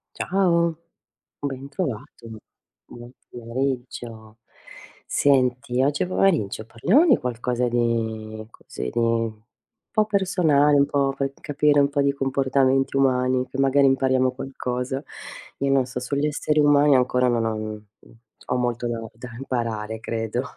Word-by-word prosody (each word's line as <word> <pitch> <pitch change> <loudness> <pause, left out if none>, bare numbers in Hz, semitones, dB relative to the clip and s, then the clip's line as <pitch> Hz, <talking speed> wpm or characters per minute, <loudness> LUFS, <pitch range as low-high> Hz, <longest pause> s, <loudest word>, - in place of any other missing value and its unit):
Ciao, 170 -3 +1 0.7
ben 140 -1 -5
trovato. 130 - -5 0.6
Buon 120 +1 -12 0.2
pomeriggio. 120 -2 -5 0.7
Senti 125 -2 +1
oggi 145 +4 +1
pomeriggio 165 - +1
parliamo 180 - +3
di 270 -8 +6
qualcosa 125 0 -2
di 110 -2 -2
così, - - -8
di 115 -1 0 0.6
po' 215 - +2
personale, 180 -8 +3
un 140 - +4
po' 140 -1 0
per 135 0 -2
capire 145 0 +2
un 140 - +3
po' 145 0 0
di 140 0 +2
comportamenti 135 0 +1
umani, 130 -1 +2
che 135 - -8
magari 135 0 +4
impariamo 130 -1 +2
qualcosa. 130 0 -4 0.6
Io 140 0 0
non 135 -2 +3
so, 125 0 -5
sugli 140 +4 -1
esseri 150 0 0
umani 145 -1 +5
ancora 125 0 +2
non 120 -2 +1
ho 110 -1 -1
mhmm, 110 0 -6 0.7
ho - - +2
molto 120 -1 -1
da 120 -1 -2 0.2
da 125 +2 -10
imparare, 115 -4 -3
credo. 115 +2 -3
130 Hz, 130 wpm, -23 LUFS, 120-140 Hz, 0.7 s, di